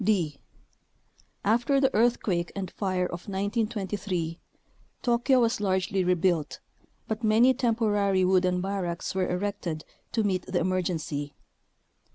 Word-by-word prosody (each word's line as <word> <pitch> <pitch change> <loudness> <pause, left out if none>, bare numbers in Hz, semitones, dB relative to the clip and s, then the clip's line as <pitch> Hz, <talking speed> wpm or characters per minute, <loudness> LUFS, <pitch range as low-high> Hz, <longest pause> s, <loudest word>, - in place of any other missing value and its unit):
d. 180 -8 +1 1.1
After 240 +6 +3
the 270 0 +2
earthquake 210 -6 +1
and 190 -3 -4
fire 185 -3 -1
of 175 0 -6
1923, 200 -4 -2 0.6
Tokyo 245 +2 +3
was 230 -3 +1
largely 190 -1 +1
rebuilt, 175 -3 +1 0.5
but 220 +1 -3
many 225 +4 +5
temporary 210 -6 +2
wooden 180 -1 +2
barracks 185 -3 -3
were 185 -1 0
erected 180 -4 -3 0.3
to 225 - +1
meet 185 -3 0
the 180 -1 0
emergency. 165 -5 -2
190 Hz, 115 wpm, -27 LUFS, 180-220 Hz, 1.1 s, many